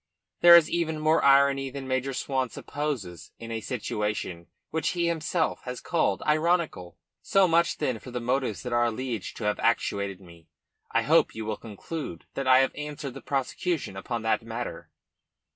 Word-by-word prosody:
There 175 0 +10
is 170 -2 +7
even 165 -2 -1
more 155 +1 +3
irony 140 0 +4
than 135 0 -7
Major 130 +1 -1
Swan 130 -2 -1
supposes 105 - -5
in 115 0 -8
a 115 -1 -3
situation 105 -7 -3 0.2
which 160 +3 0
himself 170 -1 0
has 125 0 -5
called 130 - 0
ironical. 155 - +1 0.2
"So 195 -1 +4
much, 170 0 +2
then, 130 -7 -1
for 125 - -11
the 125 0 -3
motives 120 -6 -1
that 125 - -4
are 120 0 +3
alleged 120 -2 -3
to - - -6
have 105 0 0
actuated 100 -4 0
me. 85 -3 -16 0.4
I - - +2
hope - - +3
you 110 -1 -5
will 110 0 -2
conclude 115 - -7
that 135 -1 -3
I 130 0 +7
have 135 - +1
answered 150 -2 -6
the 135 - -9
prosecution 140 - -2
upon 115 +4 -4
that 110 - +1
matter. 115 +1 -6
130 Hz, 170 wpm, -27 LUFS, 110-150 Hz, 0.4 s, There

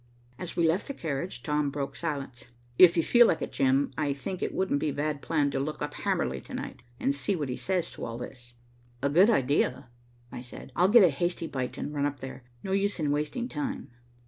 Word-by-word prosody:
As 180 - -5
we 170 -1 +3
left 170 +5 +1
the 280 - -5
carriage, 155 - -4
Tom 150 -1 +1
broke 140 -1 -4
silence. 135 -4 -4 0.3
"If 175 -1 +8
you 165 - +4
feel 240 +5 +6
like 160 - +1
it, - - -5
Jim, 135 +1 +2
I 145 -2 +1
think 175 +7 -5
it - - -1
wouldn't 185 -7 0
be 155 - 0
a - - -3
bad 145 0 -2
plan 150 -3 +1
to 135 - -1
look 150 +3 -3
up - - -4
Hamerly - - -1
to - - -7
night, - - -6 0.2
and 140 - +1
see 165 +8 0
what 145 -6 -3
he 125 - -2
says 185 +2 -1
to - - -6
all 115 0 -5
this." 120 0 -9 0.5
"A 140 - +3
good 180 +9 +6
idea," 135 - +1 0.4
I 120 - -6
said. 125 +2 -10
"I'll 180 - +4
get 230 0 +8
a 180 - +7
hasty 175 +4 -1
bite 130 -5 -4
and 150 - -4
run 145 -1 +1
up 145 -1 -5
there. 130 +1 -7 0.2
No 190 - -4
use 200 0 +1
in 150 -2 +1
wasting 150 - -1
time." 275 - -4
150 Hz, 230 wpm, -28 LUFS, 135-180 Hz, 0.5 s, If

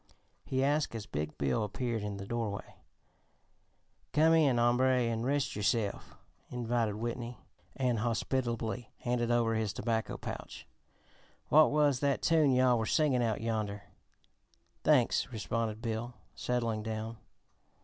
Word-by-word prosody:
he 130 0 0
asked 145 -2 +1
as 110 -2 -5
big 75 -3 -4
Bill 70 - 0
appeared 115 +2 -2
in 105 -1 -4
the 100 - -6
doorway. 110 -2 -4 1.4
"Come 160 +2 +5
in, 145 -6 +4
hombre, 125 +2 +3
an' 115 -1 -1
rest 140 +3 0
yo'self," 105 0 -1 0.3
invited 120 -3 -1
Whitney, 120 +1 -4 0.4
and 125 -4 +1
hospitably 120 0 -1
handed 120 -1 0
over 120 -1 +2
his 110 -3 -1
tobacco 110 +1 -2
pouch. - - -7 0.8
"What 155 +2 +7
was 145 -3 +3
that 140 -1 0
tune 160 -4 +4
yo'all 125 -2 +4
were 110 - -1
singin' 145 -5 +2
out 110 -3 0
yonder?" 105 -3 -2 1.0
"Thanks," 135 -3 +3
responded 110 0 -3
Bill, 115 +1 -3 0.2
settling 115 -3 -1
down. 110 +1 -4
120 Hz, 130 wpm, -32 LUFS, 110-130 Hz, 1.4 s, What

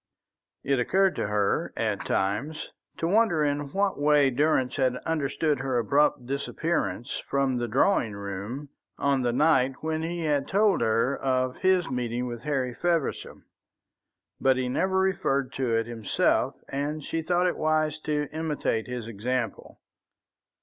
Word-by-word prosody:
It 140 -1 +1
occurred 190 +9 +2
to - - -1
her 105 -1 0
at - - -1
times 110 +12 -1 0.3
to - - -2
wonder 200 -5 +3
in 145 -1 -1
what 195 -1 0
way 145 -2 +4
Durrance 130 -1 +1
had 130 -2 +2
understood 150 -1 0
her 135 -1 -1
abrupt 140 +3 +2
disappearance 140 - -2
from 135 -2 +1
the 120 0 -1
drawing 120 - +2
room 100 +8 -6 0.3
on 140 -1 +1
the 120 -1 +1
night 135 -1 +3
when 160 0 -2
he 170 +1 -3
had 145 -3 0
told 200 - +3
her 115 +4 +2
of 130 -1 0
his 185 -2 +2
meeting 125 -1 -2
with 120 -2 -5
Harry 130 -3 -1
Feversham. 170 0 -2 0.9
But 130 -1 +3
he 130 -1 -1
never 190 +8 0
referred 175 -9 0
to 125 -4 +1
it 115 0 +1
himself, 115 -3 0
and 145 +2 -3
she 165 - -2
thought 175 +2 +1
it 180 - +1
wise 155 -1 0
to 150 -1 -1
imitate 150 -8 -1
his 125 -3 -5
example. 115 +1 -3
140 Hz, 150 wpm, -27 LUFS, 125-155 Hz, 0.9 s, way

